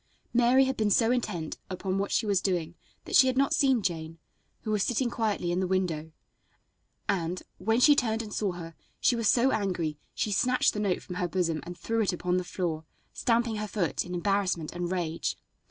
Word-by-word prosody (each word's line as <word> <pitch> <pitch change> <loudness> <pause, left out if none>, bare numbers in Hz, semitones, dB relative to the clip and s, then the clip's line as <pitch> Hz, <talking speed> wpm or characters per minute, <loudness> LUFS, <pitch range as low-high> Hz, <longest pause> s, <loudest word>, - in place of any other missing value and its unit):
Mary 245 +2 +5
had 265 0 -1
been 215 -3 +1
so 225 +3 +4
intent 175 -10 -2
upon 190 +1 -2
what 200 - -2
she 225 - +1
was 200 -3 +2
doing 170 -4 -1 0.3
that - - -2
she 260 - +8
had 260 0 0
not 275 +2 +3
seen 265 -7 +3
Jane, 165 -3 -3 0.4
who 215 - -3
was 210 -2 +1
sitting 245 +3 0
quietly 210 -7 -1
in 175 - 0
the 185 - 0
window, 170 -4 -1 1.0
and, 180 -1 -1 0.2
when 225 +5 +1
she 295 +3 +7
turned 225 -4 0
and 210 -2 -8
saw 200 -4 -1
her, 165 -1 -8 0.3
she 245 - +3
was 230 -3 +1
so 255 +2 +4
angry 175 -8 -1 0.2
she 210 - -1
snatched 250 +5 +2
the 210 - -3
note 200 -4 0
from 180 - -7
her 180 - 0
bosom 170 -3 0
and 175 0 -7
threw 225 +6 -1
it 200 -3 +1
upon 180 +1 0
the 180 - 0
floor, 175 -3 -3 0.3
stamping 235 -2 +1
her 210 0 -3
foot 190 -6 -1
in 180 0 -6
embarrassment 185 -3 0
and 175 0 -3
rage. 170 -3 -2
195 Hz, 205 wpm, -28 LUFS, 175-230 Hz, 1.0 s, she